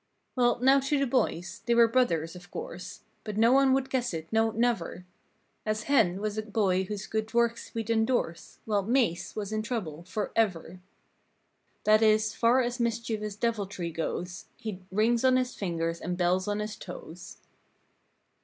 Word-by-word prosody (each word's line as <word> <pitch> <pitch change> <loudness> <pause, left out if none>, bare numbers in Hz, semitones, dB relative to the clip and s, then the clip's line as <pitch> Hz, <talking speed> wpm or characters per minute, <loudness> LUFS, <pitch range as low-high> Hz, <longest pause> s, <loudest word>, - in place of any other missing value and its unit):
Well, 240 -2 +3
now 265 +3 +5
to 275 +2 0
the 275 - +2
boys: 235 -8 -1
They 235 - +3
were 235 0 +7
brothers, 185 -10 +1
of 180 +1 -12
course. - - -7 0.2
But 210 -2 -5
no 230 +2 +5
one 270 0 +5
would 265 0 0
guess 250 -9 0
it, 160 0 -5
no, 225 0 +3
never; 225 -6 -1 0.6
As 215 0 -1
"Hen" 215 -10 +3
was 215 +1 -2
a - - 0
boy 200 -3 +1
whose 195 0 -5
good 220 +1 -3
works 235 0 +1
we'd 225 0 -2
endorse 220 -6 0
While 210 -2 +1
"Mase" 215 -6 0
was 210 -1 -4
in 215 - 0
trouble, 210 -10 -4
forever. 185 -3 -1 1.0
That 215 +1 +5
is, 215 0 +3
far 240 +3 +3
as 245 +1 -3
mischievous 225 -3 -2
deviltry 200 -6 -2
goes 175 +2 -4
He'd 200 -4 -6
"rings 225 +4 +2
on 260 -1 +5
his 255 -1 -1
fingers 165 -3 -2
and 180 +1 -3
bells 185 +1 +1
on 205 0 -1
his 210 0 -5
toes." 180 +1 -9
215 Hz, 165 wpm, -28 LUFS, 185-235 Hz, 1.0 s, were